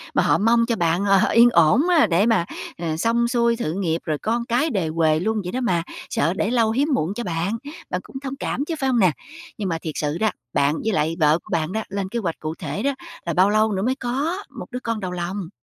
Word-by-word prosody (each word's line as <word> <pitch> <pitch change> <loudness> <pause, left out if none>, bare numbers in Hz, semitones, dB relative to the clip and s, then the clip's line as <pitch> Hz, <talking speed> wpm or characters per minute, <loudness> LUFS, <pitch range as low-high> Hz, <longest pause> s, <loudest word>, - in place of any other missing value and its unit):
mà - - +4
họ - - +3
mong 230 +2 +3
cho 235 - 0
bạn 175 +1 +1
là 195 -1 +4
yên 235 +1 +7
ổn 230 - +4
á 320 -9 +5
để 185 +3 +3
mà, 225 -7 +2 0.3
ờ, 165 -2 -3
xong 235 +6 +2
xuôi 235 -1 +2
sự 155 -7 -2
nghiệp 170 -4 -1
rồi 155 -2 -1
con 235 +5 -1
cái 250 +8 +1
đề 190 - -1
huề 155 -1 +2
luôn 215 +4 0
vậy 180 - -4
đó 255 - -2
mà, 175 -9 +1 0.3
sợ 165 +4 +1
để 210 +4 -1
lâu 230 -3 +3
hiếm 275 +6 +1
muộn 175 -6 0
cho 240 +3 -4
bạn, 175 +4 -2 0.3
bạn - - -2
cũng 265 - -9
thông 270 0 -5
cảm 275 +1 -3
chứ, 330 - -3
phải 270 -2 +1
hông 245 -2 +2
nè? 185 -5 +5 0.5
Nhưng 200 -3 -2
mà 165 - -1
thiệt 160 - -4
sự 150 +2 -1
đó, 220 +2 +2 0.2
bạn 140 +1 +2
với 220 - 0
lại 160 0 +1
vợ 155 +1 +4
của - - -17
bạn 165 -1 0
đó, 220 +2 -2
lên 195 -1 -3
kế 235 - -2
hoạch 170 -7 -3
cụ 155 +1 -4
thể 205 - -4
đó 280 - +2 0.3
là 170 - -1
bao 185 +4 +4
lâu 215 +1 +3
nữa 190 -1 -1
mới 255 +4 +1
có 280 +8 -2 0.2
một - - -5
đứa 250 - -4
con 230 -3 -3
đầu 185 -3 -4
lòng? 180 +1 -4
205 Hz, 265 wpm, -22 LUFS, 170-235 Hz, 0.5 s, yên